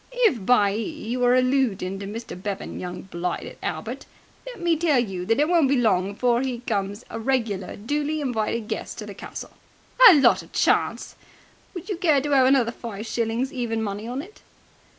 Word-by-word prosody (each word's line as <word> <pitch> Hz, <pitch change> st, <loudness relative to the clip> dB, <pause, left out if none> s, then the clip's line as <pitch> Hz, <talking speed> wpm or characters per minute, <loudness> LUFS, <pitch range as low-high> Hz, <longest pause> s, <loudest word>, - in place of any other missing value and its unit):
"If 245 Hz, -, +2 dB
by 205 Hz, -3 st, +4 dB
'e 215 Hz, -, -2 dB, 0.3 s
you're 245 Hz, 0 st, +3 dB
alloodin' 255 Hz, -8 st, +1 dB
to 195 Hz, -, -6 dB
Mr. 230 Hz, +3 st, -7 dB
Bevan, 195 Hz, +2 st, -5 dB
young 180 Hz, 0 st, -6 dB
blighted 180 Hz, -1 st, -5 dB
Albert, -, -, -5 dB, 0.4 s
let -, -, -8 dB
me 345 Hz, -1 st, +2 dB
tell 315 Hz, -3 st, +2 dB
you 190 Hz, -7 st, -2 dB
that 225 Hz, +4 st, +2 dB
it 300 Hz, -, +3 dB
won't 335 Hz, -5 st, +3 dB
be 280 Hz, -, +3 dB
long 200 Hz, -5 st, +2 dB
before 240 Hz, +2 st, +1 dB
'e 260 Hz, -2 st, -2 dB
becomes 205 Hz, -2 st, -3 dB
a -, -, -5 dB
regular 225 Hz, -6 st, -1 dB
duly 295 Hz, +7 st, -2 dB
invited 230 Hz, -4 st, -2 dB
guest -, -, -5 dB
at -, -, -9 dB
the -, -, -7 dB
castle!" -, -, -8 dB, 0.6 s
"A 360 Hz, -, +8 dB
lot 280 Hz, -, +4 dB
of -, -, -17 dB
chance!" -, -, +1 dB, 0.6 s
"Would 355 Hz, -, -7 dB
you 400 Hz, -5 st, -3 dB
care 320 Hz, -6 st, +3 dB
to 290 Hz, +1 st, -2 dB
'ave 260 Hz, -2 st, +5 dB
another 260 Hz, -4 st, +3 dB
five 225 Hz, -3 st, -7 dB
shillings 235 Hz, +3 st, -2 dB
even 230 Hz, -3 st, -2 dB
money 205 Hz, +1 st, -4 dB
on 255 Hz, +4 st, -4 dB
it?" 415 Hz, +5 st, -16 dB
240 Hz, 190 wpm, -24 LUFS, 205-275 Hz, 0.6 s, A